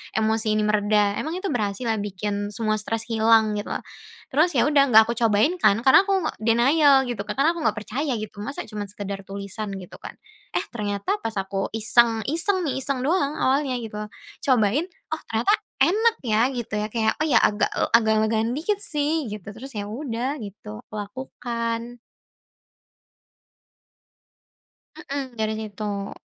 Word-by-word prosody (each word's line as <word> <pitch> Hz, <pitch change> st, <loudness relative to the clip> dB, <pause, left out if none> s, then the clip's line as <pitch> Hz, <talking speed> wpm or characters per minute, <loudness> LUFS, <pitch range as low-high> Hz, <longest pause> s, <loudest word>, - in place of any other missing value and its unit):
emosi 220 Hz, 0 st, +1 dB
ini 215 Hz, -, +1 dB
mereda? 210 Hz, -1 st, +2 dB
Emang 315 Hz, -, -3 dB
itu 375 Hz, 0 st, -3 dB
berhasil 210 Hz, -1 st, -2 dB
ya 220 Hz, -, +1 dB
bikin 205 Hz, +1 st, -3 dB
semua 215 Hz, -2 st, 0 dB
stres 225 Hz, +1 st, -2 dB
hilang? 220 Hz, -1 st, +4 dB
Gitu 205 Hz, -, -4 dB
loh. -, -, -3 dB, 0.5 s
Terus 315 Hz, +5 st, +3 dB
ya 240 Hz, -, +4 dB
udah 280 Hz, -2 st, +4 dB
enggak 220 Hz, -3 st, +8 dB
aku 235 Hz, -, -2 dB
cobain 230 Hz, -, +3 dB
kan, 200 Hz, -, +5 dB
karena 325 Hz, +10 st, +6 dB
aku 385 Hz, -2 st, +1 dB, 0.2 s
denial 265 Hz, +5 st, +4 dB
gitu. 240 Hz, -4 st, -4 dB
Karena 280 Hz, +5 st, +2 dB
aku 340 Hz, -, -6 dB
enggak 210 Hz, -, 0 dB
percaya 270 Hz, +6 st, -2 dB
gitu. 215 Hz, -2 st, -6 dB
Masa 280 Hz, -, -5 dB
cuma 210 Hz, -2 st, -5 dB
sekedar 195 Hz, 0 st, -6 dB
tulisan 200 Hz, +1 st, -6 dB
gitu 185 Hz, -2 st, -10 dB
kan. -, -, -9 dB, 0.4 s
Eh, -, -, +1 dB
ternyata 210 Hz, -, -2 dB
pas 225 Hz, -, -2 dB
aku 195 Hz, 0 st, -2 dB
iseng-iseng 240 Hz, -, +3 dB
nih, 265 Hz, -, -1 dB
iseng 270 Hz, -1 st, -1 dB
doang 290 Hz, -1 st, +1 dB
awalnya 270 Hz, 0 st, +1 dB
gitu. 210 Hz, -1 st, -6 dB, 0.5 s
Cobain, 255 Hz, -, +3 dB, 0.3 s
"Oh, 315 Hz, -, -2 dB
ternyata 225 Hz, -, +1 dB, 0.3 s
enak 440 Hz, +9 st, +3 dB
ya," 220 Hz, -1 st, +2 dB
gitu 235 Hz, -4 st, -5 dB
ya. 210 Hz, -, -1 dB
Kayak, 220 Hz, -2 st, +2 dB
“Oh, 310 Hz, -, +1 dB
ya, 245 Hz, -7 st, +5 dB
agak 205 Hz, -, +3 dB, 0.3 s
agak 220 Hz, -1 st, +4 dB
legaan 220 Hz, +1 st, +1 dB
dikit 400 Hz, +6 st, -1 dB
sih,” 300 Hz, -5 st, -1 dB
gitu. 210 Hz, -1 st, -7 dB
Terus 265 Hz, +4 st, -9 dB
ya 205 Hz, -1 st, -3 dB
udah 260 Hz, +2 st, -3 dB
gitu, 195 Hz, -, -9 dB
aku -, -, -11 dB
lakukan. 235 Hz, +1 st, -4 dB, 3.0 s
Mhm. 270 Hz, -3 st, -5 dB
Dari 220 Hz, 0 st, 0 dB
situ. 205 Hz, -2 st, -5 dB
225 Hz, 160 wpm, -24 LUFS, 210-275 Hz, 3.0 s, enggak